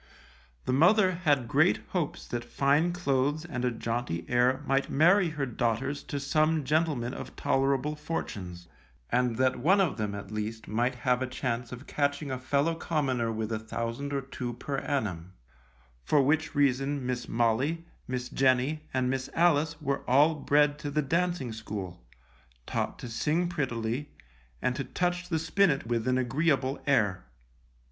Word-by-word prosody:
The - - 0
mother 185 +7 +5
had 150 -9 +1
great - - +3
hopes - - -3
that 120 - -3
fine 140 +7 +2
clothes 145 -2 0
and 125 -8 -4
a 125 - +3
jaunty 115 -6 -3
air 125 +3 +2
might 135 0 +1
marry 175 +5 +4
her 150 -3 -2
daughters 120 +3 -1
to 145 - -3
some 155 +2 +2
gentlemen 145 -4 0
of - - -8
tolerable 135 +2 +1
fortunes, 95 - -5 0.4
and 125 -1 +2
that 130 0 +2
one 185 +10 +4
of 180 -9 +1
them, 105 -2 -2
at 100 0 -8
least, 110 +1 -4
might 120 +4 0
have 125 0 +1
a 130 - 0
chance 125 -1 -3
of 125 +2 -8
catching 145 0 -1
a 130 - -3
fellow 140 +5 +1
commoner 135 -8 -1
with 110 0 -3
a 110 - -1
thousand 115 +5 -4
or 140 -1 -1
two 125 -2 -5
per 135 +3 -3
annum, 95 - -3 0.7
for 150 - +3
which 155 +3 +1
reason 140 -1 +1
Miss 125 -1 -3
Molly, 125 +9 +1 0.2
Miss 125 -1 -3
Jenny, 135 +4 +1
and 130 -1 +2
Miss 130 0 -2
Alice 160 -1 +3
were 140 -2 -1
all 145 +5 +5
bred 145 0 +2
to 145 - -4
the 150 +1 0
dancing 170 -4 0
school, 100 - -6 0.6
taught - - -2
to - - -7
sing 155 +9 0
prettily, 130 -5 -2 0.5
and 125 - +1
to 140 - -2
touch 180 +6 -2
the 165 - +1
spinet 165 - +2
with 115 0 -1
an 130 0 +2
agreeable 135 +1 +1
air. 105 - +2
135 Hz, 160 wpm, -29 LUFS, 120-150 Hz, 0.7 s, mother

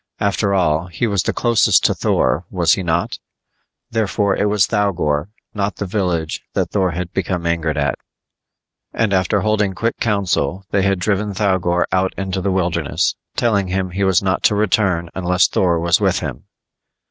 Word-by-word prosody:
After 100 0 +1
all, 80 -2 +1
he 85 +6 -2
was 100 -4 +1
the - - -1
closest 120 -2 +3
to - - +4
Thor, 65 +7 +1
was 85 -4 +2
he 95 - -1
not? 85 -1 -1 0.7
Therefore 105 -2 0
it 105 - +1
was 105 -3 +3
Thougor, 90 -8 0 0.3
not 100 0 -2
the 105 - -4
village, 90 -5 -2
that - - 0
Thor 95 -3 +1
had 90 0 -5
become 90 -2 -2
angered 80 -2 -1
at. 70 0 0 0.9
And 110 -3 0
after 95 +2 +1
holding 105 -2 +1
quick 115 +4 -2
council, 100 -3 0
they 100 - +2
had 100 0 +1
driven 100 +2 -1
Thougor 95 -4 +1
out 95 0 0
into 95 -1 -3
the 100 - -1
wilderness, 85 -4 0 0.2
telling 100 -5 +1
him 95 0 -2
he 100 +2 -2
was 95 -1 +3
not 95 0 0
to 105 - +4
return 95 -5 +1
unless 90 -1 +2
Thor 85 -3 +1
was 85 +1 +2
with - - +2
him. - - -6
95 Hz, 170 wpm, -19 LUFS, 85-100 Hz, 0.9 s, to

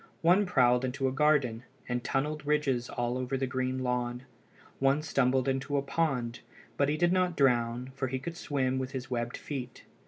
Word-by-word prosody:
One 185 +4 +5
prowled 125 -5 +4
into 130 +1 -1
a - - 0
garden, 135 -5 +2 0.3
and 120 -1 -2
tunnelled 150 +3 -1
ridges 145 -4 0
all 120 +1 -2
over 130 +1 -2
the 135 - 0
green 130 0 -2
lawn. 125 0 -1 0.6
One 135 +3 +3
stumbled 130 -3 +2
into 135 +2 0
a 140 - 0
pond, 135 -6 -1 0.4
but 140 0 +2
he 150 - 0
did 175 +1 +3
not 180 -2 +1
drown, 125 -1 +2
for 135 0 -2
he 130 +1 -2
could 165 +6 -6
swim 130 -6 -1
with 130 +1 -4
his 130 -1 -5
webbed 120 -1 -2
feet. 130 -4 -6
130 Hz, 185 wpm, -30 LUFS, 125-145 Hz, 0.6 s, One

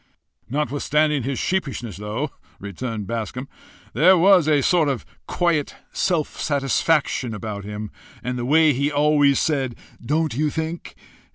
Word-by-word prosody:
"Notwithstanding 150 +1 +1
his 130 +2 -3
sheepishness, 135 - -2
though," 110 +8 -3 0.3
returned 105 +2 -5
Bascombe, 115 +5 -4 0.5
"there 185 +4 +6
was 180 -2 +5
a 145 -3 +3
sort 165 -2 +3
of 130 -5 -3 0.2
quiet 170 -5 0 0.2
self 170 -5 -1
satisfaction 140 -3 +1
about 105 -1 -6
him, 105 0 -6 0.3
and 125 +1 -2
the 120 - -3
way 155 +2 +5
he 140 +3 0
always 145 -1 +3
said 135 -6 0 0.3
Don't 155 +3 0
you 150 +5 0
think? 160 +2 -5
140 Hz, 130 wpm, -22 LUFS, 120-155 Hz, 0.5 s, there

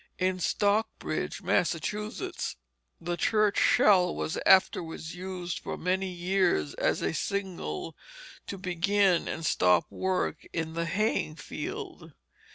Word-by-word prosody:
In 185 0 0
Stockbridge, 205 +4 0
Massachusetts, 210 +6 -1 0.4
the 175 +1 -2
church 210 +4 +2
shell 180 -4 +5
was 160 - -2
afterwards 165 -3 +3
used 180 -1 -5
for - - -5
many 190 +1 0
years 175 - +1
as - - 0
a 80 -1 0
signal 180 - -3 0.5
to 200 - -5
begin 185 0 +2
and 165 - -4
stop 90 -10 +3
work 185 -1 -1
in 165 -1 -2
the 170 0 -1
haying 190 -4 0
field. 150 - -7
180 Hz, 115 wpm, -29 LUFS, 165-195 Hz, 0.5 s, shell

